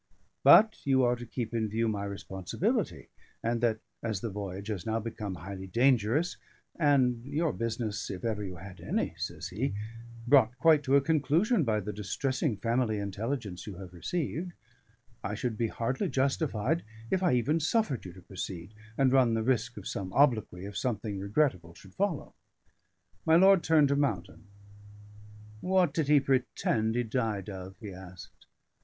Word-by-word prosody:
But 215 0 +7
you 135 -2 +3
are 120 0 +3
to 120 0 -9
keep 120 0 -4
in 110 -2 0
view 115 +2 0
my 100 -2 -2
responsibility, 95 -2 -2 0.3
and 115 0 0
that 115 -2 +2 0.2
as 110 -4 -2
the 115 - -3
voyage 100 +1 -5
has 100 -5 -3
now 110 +1 -1
become 110 -3 -5
highly 95 +2 -7
dangerous, 125 - +2 0.4
and 130 -6 +3
your 150 +4 -1
business 110 -3 -3
if 95 -2 -6
you 115 - +1
ever 100 -5 -4
had 95 -1 -10
any," - - -1
says - - -4
he, 105 +3 -2 0.5
"brought 125 -2 +5
quite 155 +2 +5
to 135 - +3
a 140 - +6
conclusion 160 - +2
by 110 -4 +1
the 105 +1 -5
distressing 130 - -1
family 115 +1 0
intelligence 100 0 -4
you 100 - -6
have 90 -1 -10
received, 170 - -3 0.7
I 100 +1 -2
should 115 +1 -2
be 115 +1 0
hardly 115 +4 -2
justified 135 +1 0 0.3
if 190 - +2
I 180 -8 +3
even 145 +7 +2
suffered 160 - 0
you 90 - -8
to 90 -1 -14
proceed, 95 0 -6 0.2
and 135 -1 +3
run 125 -4 +4
the 110 - 0
risk 120 -1 0
of 100 - -7
some 95 -2 -4
obloquy 110 -10 +2
if 100 +1 -5
anything 105 -4 -2
regrettable 100 - 0
should 95 +1 -15
follow." 195 -8 -2 0.9
My 160 - +4
lord 190 +1 +7
turned 155 -3 +4
to 140 - +2
Mountain. 105 -8 -2 1.1
"What 180 -2 +2
did 155 -2 0
he 150 0 +6
pretend 125 -4 0
he 120 - +1
died 110 -4 -2
of?" 95 0 -8
he 105 -3 -7
asked. 90 -1 -12
115 Hz, 165 wpm, -30 LUFS, 100-140 Hz, 1.1 s, But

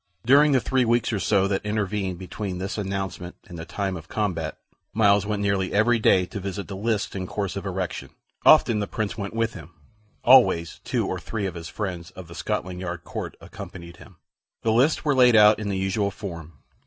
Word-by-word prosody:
During 145 +4 +6
the 135 - +4
three 130 +1 +1
weeks 120 0 +1
or 105 - 0
so 95 +1 +2
that 100 -1 -1
intervened 105 -3 -2
between 95 +1 -5
this 95 +3 -4
announcement 95 -3 -4
and 85 -3 -10
the 80 - -6
time 95 +1 -3
of 85 -1 -9
combat, 85 -7 -2 0.4
Myles 105 -2 +4
went 105 -1 -1
nearly 100 -2 0
every 115 +3 +3
day 95 -4 +4
to 100 - -7
visit 100 +1 -5
the 100 - -6
lists 105 +1 -1
in 95 -1 -4
course 100 -1 -3
of 100 0 -4
erection. 90 -2 -4 0.3
Often 110 -2 +6
the 100 - -2
Prince 110 -2 -3
went 100 0 -5
with 115 -1 0
him; 80 0 -11 0.5
always 120 -10 +5
two - - -1
or - - -3
three 105 -3 -4
of 95 - -3
his 85 -1 -7
friends 90 -5 -5
of 90 -2 -9
the 85 - -11
Scotland 90 -1 -3
Yard 85 -2 -5
court - - -6
accompanied 85 -2 -10
him. - - -15 0.5
The 115 - +2
lists 135 +9 +2
were 145 - +3
laid 125 -3 +5
out 105 0 +7
in 105 -1 -3
the 95 - -1
usual 95 +2 0
form. 85 -5 -8
100 Hz, 205 wpm, -24 LUFS, 90-110 Hz, 0.5 s, out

